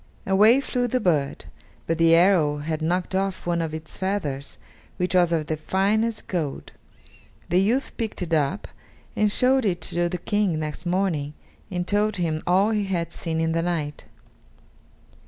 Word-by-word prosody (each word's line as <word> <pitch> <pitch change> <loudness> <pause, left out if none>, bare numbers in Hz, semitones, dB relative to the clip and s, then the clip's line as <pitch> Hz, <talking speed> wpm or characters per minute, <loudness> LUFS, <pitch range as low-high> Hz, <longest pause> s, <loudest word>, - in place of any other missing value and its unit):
Away 215 +7 +5
flew 250 -2 -1
the 255 +2 0
bird, 155 - 0 0.4
but 165 0 -1
the 165 0 +6
arrow 170 -4 +4
had 155 +1 -3
knocked 180 +4 -1
off 190 0 -1
one 170 -1 0
of 165 -1 -3
its 160 0 -7
feathers, 155 -8 -3 0.4
which 180 0 -1
was 175 -2 +4
of 160 -2 0
the 155 - -2
finest 210 +7 0
gold. 160 -7 -3 0.8
The 180 +2 +3
youth 240 +8 0
picked 220 -5 -3
it 170 -1 -4
up 155 +5 0 0.5
and 210 -1 +2
showed 260 +3 +3
it 185 -5 0
to 175 +1 -1
the 180 - -3
King 195 -1 0
next 155 +3 -5
morning, 170 -6 -1 0.3
and 180 -2 -2
told 210 +1 +1
him 160 -3 -1
all 190 +5 +3
he 210 -2 0
had 170 -3 -2
seen 165 -2 -3
in 165 0 +1
the 165 +1 +1
night. 160 -4 -3
175 Hz, 170 wpm, -24 LUFS, 160-200 Hz, 0.8 s, the